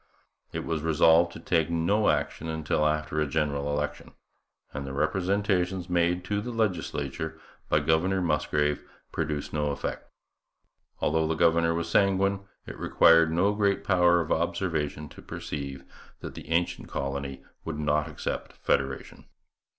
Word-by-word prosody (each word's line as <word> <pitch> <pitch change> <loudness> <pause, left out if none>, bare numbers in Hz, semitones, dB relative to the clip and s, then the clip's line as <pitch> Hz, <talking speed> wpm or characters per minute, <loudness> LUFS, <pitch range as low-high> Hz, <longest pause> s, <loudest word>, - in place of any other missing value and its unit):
It - - -4
was 80 -2 -2
resolved 80 +2 +4
to - - -9
take 80 -1 +1
no 85 +6 +2
action 80 - -1
until 75 -1 0
after 75 0 -1
a 75 - +1
general 70 -1 -1
election; 75 +1 -3 0.6
and 70 - -4
the 70 -1 -6
representations 90 +3 0
made 90 +1 +1
to 105 +1 -1
the 120 - -5
legislature 80 - -2 0.3
by 75 - +3
Governor 80 +5 +2
Musgrave 75 -3 0 0.3
produced 75 -2 -3
no 75 -1 0
effect. 70 - -4 0.9
Although 80 +1 +2
the 80 - 0
governor 85 0 +3
was 85 0 -2
sanguine, 100 +2 +2 0.3
it - - -9
required 80 -1 +5
no 95 +5 +2
great 100 -1 +1
power 90 -2 +4
of 80 - -5
observation 80 -3 -1
to - - -13
perceive 70 -2 -6 0.4
that - - -7
the - - -10
ancient 85 +1 0
colony 70 0 -4 0.2
would 80 -2 -4
not 75 0 +1
accept 75 - -4
federation. 65 0 -2
80 Hz, 145 wpm, -27 LUFS, 75-90 Hz, 0.9 s, required